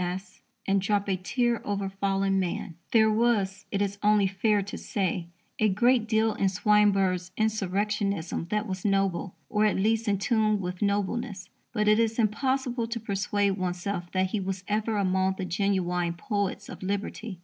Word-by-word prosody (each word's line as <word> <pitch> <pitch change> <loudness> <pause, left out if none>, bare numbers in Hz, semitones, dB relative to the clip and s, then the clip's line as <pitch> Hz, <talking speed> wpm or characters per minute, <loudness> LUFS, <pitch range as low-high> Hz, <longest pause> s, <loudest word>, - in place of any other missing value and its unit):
C.S.," 185 +2 -5 0.2
and 195 0 +2
drop 200 +1 0
a 195 - +1
tear 235 +6 0
over 200 -1 -2
fallen 195 0 0
man. 175 -2 -3 0.2
There 220 -1 +5
was, 215 -4 +1
it 200 0 0
is 200 0 -3
only 210 -1 +4
fair 200 +2 +1
to 200 - -7
say, 180 -4 -2 0.3
a 215 - +4
great 235 +3 +3
deal 220 0 +2
in 195 - +1
Swinburne's 195 -2 +2
insurrectionism 200 -4 -1
that 210 0 0
was 185 -3 -5
noble, 195 -2 0
or, 210 0 +2
at 210 - +2
least, 220 +3 +1
in 200 -1 +2
tune 215 0 +2
with 180 -1 -5
nobleness. 205 0 -1 0.2
But 210 -2 0
it 215 +1 +5
is 225 -1 +1
impossible 245 +1 0
to 230 0 -3
persuade 200 -1 0
oneself 180 0 -3
that 185 0 +1
he 215 - 0
was 190 0 -4
ever 215 +1 0
among 190 -1 +1
the 190 - -3
genuine 180 -2 0
poets 200 +2 -2
of - - -9
liberty. 200 +1 -4
200 Hz, 170 wpm, -27 LUFS, 190-215 Hz, 0.3 s, There